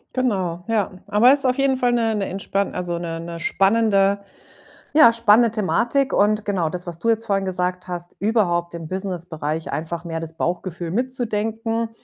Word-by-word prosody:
Genau, 190 -9 -1
ja. 210 -3 +1 0.2
Aber 240 +6 +5
ist 280 -2 +2
auf 255 +1 +2
jeden 275 -1 +2
Fall 250 -1 +1
'ne 230 -2 +1
'ne 200 -2 -1
entspan 195 +1 -2
also, 175 -1 -2
'ne 165 -1 -4
'ne 170 0 -6
spannende 200 0 +3 0.8
ja, 235 -7 +8
spannende 230 0 +4
Thematik. 235 +6 0
Und 210 +1 +2
genau 185 -6 0
das, 180 +2 -6
was 170 -1 -6
du 230 - -1
jetzt 225 0 +1
vorhin 195 -2 0
gesagt 180 0 -2
hast, 175 -1 -6
überhaupt 175 -6 +1
im 165 -2 -6
Businessbereich 170 -4 -4
einfach 165 +2 -4
mehr 165 -1 -4
das 160 0 -6
Bauchgefühl 175 0 -3
mitzudenken, 225 -1 -1
195 Hz, 170 wpm, -22 LUFS, 175-225 Hz, 0.8 s, ja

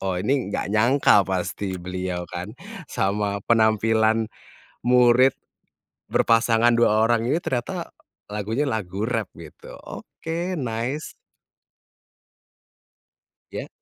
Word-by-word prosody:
oh 95 -2 -2
ini 130 +3 0
nggak 100 0 -3
nyangka 115 0 +4
pasti 95 +1 -2
beliau 90 0 -4
kan, 90 +8 -7 0.3
sama 100 +1 -1
penampilan 110 0 +2 0.6
murid 125 +1 +5 0.8
berpasangan, 115 0 +3
2 110 -2 +3
orang 115 -1 +2
ini 150 +8 +1
ternyata 120 -7 -3 0.4
lagunya 110 +7 -2
lagu 105 -1 -3
rap 115 -4 -2
gitu. 80 -2 -13
Oke, 170 +1 -5
nice. 120 +5 -3 2.4
Ya. - - -5
110 Hz, 95 wpm, -23 LUFS, 100-120 Hz, 2.4 s, murid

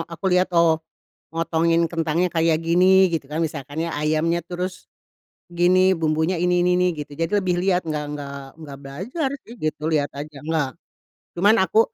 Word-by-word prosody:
aku 170 +2 -11
lihat, 180 +1 +3
"Oh 165 -1 +4 0.5
motongin 165 0 +1
kentangnya 165 +1 0
kayak 165 -1 +2
gini," 185 +3 +5
gitu 160 -4 -2
kan, 155 - -2
misalkan 150 0 -4
ya, - - -4
"ayamnya, 155 +3 0
terus 180 +1 -5 0.7
gini 185 +2 +4
bumbunya 160 +1 0
ini, 180 0 +2
ini, 180 0 +3
ini." 180 - +3
gitu. 145 -1 -7
Jadi 165 +4 -2
lebih 175 -1 0
lihat 180 -1 +1
enggak 150 -2 -3
enggak 140 -1 -6 0.2
enggak 145 -4 -9
belajar 195 - -3 0.2
sih 235 - -11
gitu, 155 -1 -3
lihat 145 -2 +1
aja. 150 0 -7
Enggak, 155 -3 -1 0.6
cuman 200 +5 +4
aku 190 +4 +1
165 Hz, 165 wpm, -22 LUFS, 155-180 Hz, 0.7 s, gini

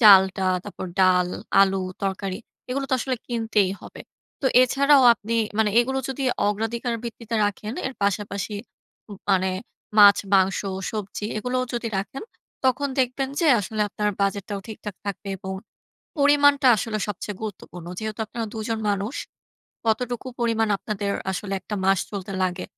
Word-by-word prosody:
চালটা, 190 -3 +7 0.2
তারপর 200 -2 -6
ডাল, 180 -1 +4 0.3
আলু, 195 -1 +4 0.2
তরকারি 195 -1 -2 0.3
এগুলো 275 +2 -1
তো - - +4
আসলে 255 -1 -1
কিনতেই 225 -5 +1
হবে। - - -11 0.4
তো 275 - +1 0.2
এছাড়াও 275 +2 +5
আপনি 225 0 -6 0.3
মানে 220 -1 +3
এগুলো 265 +2 -1
যদি 270 +1 -3 0.3
অগ্রাধিকার 230 +3 -1
ভিত্তিতে 230 0 -6
রাখেন 210 +2 -3
এর 265 - -3
পাশাপাশি 200 +1 -1 0.6
উম 200 - -7
মানে 190 0 +3 0.5
মাছ, 200 -1 +9 0.2
মাংস, 190 0 +4 0.3
সবজি 210 -1 -5
এগুলোও 250 +3 -1
যদি 235 -1 -2
রাখেন, 215 +7 -5 0.4
তখন 265 +2 +2
দেখবেন 260 +1 +1
যে 335 - +3
আসলে 215 +2 -4
আপনার 210 0 -1
বাজেটটাও 200 0 -1
ঠিকঠাক 210 -2 -7
থাকবে। 200 0 -4
এবং 190 +1 -5 0.7
পরিমাণটা 285 -1 +5
আসলে 215 0 -2
সবচেয়ে 205 0 -4
গুরুত্বপূর্ণ। 180 -5 -7
যেহেতু 215 0 -4
আপনারা 230 +1 -4
দুজন 220 +1 -2
মানুষ। 205 +6 -2 0.7
কতটুকু 245 +3 0
পরিমাণ 225 -2 +2
আপনাদের 205 -2 -3 0.2
আসলে 195 +2 -4
একটটা 210 - -6
মাস 195 0 +4
চলতে 200 -1 -5
লাগে, 180 0 -1
215 Hz, 140 wpm, -24 LUFS, 195-240 Hz, 0.7 s, মাছ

